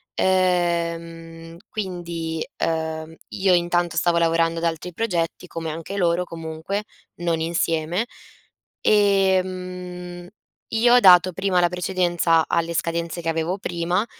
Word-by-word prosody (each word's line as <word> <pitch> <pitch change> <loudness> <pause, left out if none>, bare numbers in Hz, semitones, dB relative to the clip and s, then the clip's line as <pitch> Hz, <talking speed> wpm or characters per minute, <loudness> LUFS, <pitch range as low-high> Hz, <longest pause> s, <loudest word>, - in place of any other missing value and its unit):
Ehm, 170 -2 -1
quindi, 170 -5 -4
ehm, 160 0 -2
io 190 -1 +2
intanto 175 -1 +1
stavo 170 +2 +2
lavorando 165 0 +2
ad 170 - -2
altri 165 +2 -2
progetti, 180 -4 -2
come 165 -1 -5
anche 165 +5 -6
loro 175 -1 +2
comunque, 165 +5 -5 0.3
non 170 -1 -1
insieme. 165 +5 0 0.7
Ehm, 185 -3 0 0.4
io 235 +2 +4
ho - - +8
dato 185 -2 +7
prima 190 0 +1
la 175 - +3
precedenza 175 -2 +1
alle 170 0 0
scadenze 170 +1 -2
che 165 - -2
avevo 165 +4 -1
prima, 175 +3 -1
170 Hz, 120 wpm, -23 LUFS, 165-185 Hz, 0.7 s, ho